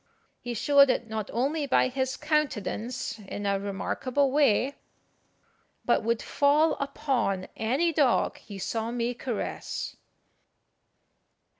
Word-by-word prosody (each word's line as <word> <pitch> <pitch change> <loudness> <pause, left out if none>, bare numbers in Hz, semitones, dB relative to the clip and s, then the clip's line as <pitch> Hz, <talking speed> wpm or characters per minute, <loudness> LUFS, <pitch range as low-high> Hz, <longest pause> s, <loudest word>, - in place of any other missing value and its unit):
He 245 -1 -5
showed 280 +4 +5
it 240 -2 0
not 220 -2 -4
only 285 +5 0
by 260 - +4
his 260 0 -2
countenance 250 - -2
in 205 0 -6
a 200 -1 +1
remarkable 255 +7 -1
way, 275 -2 +3 1.1
but - - +3
would 230 +1 0
fall 295 +3 +3
upon 265 -9 -1
any 275 +10 +1
dog 285 -6 +2
he 200 - -10
saw 225 +4 -2
me 240 0 -1
caress. 245 -2 -4
250 Hz, 115 wpm, -27 LUFS, 220-280 Hz, 1.1 s, showed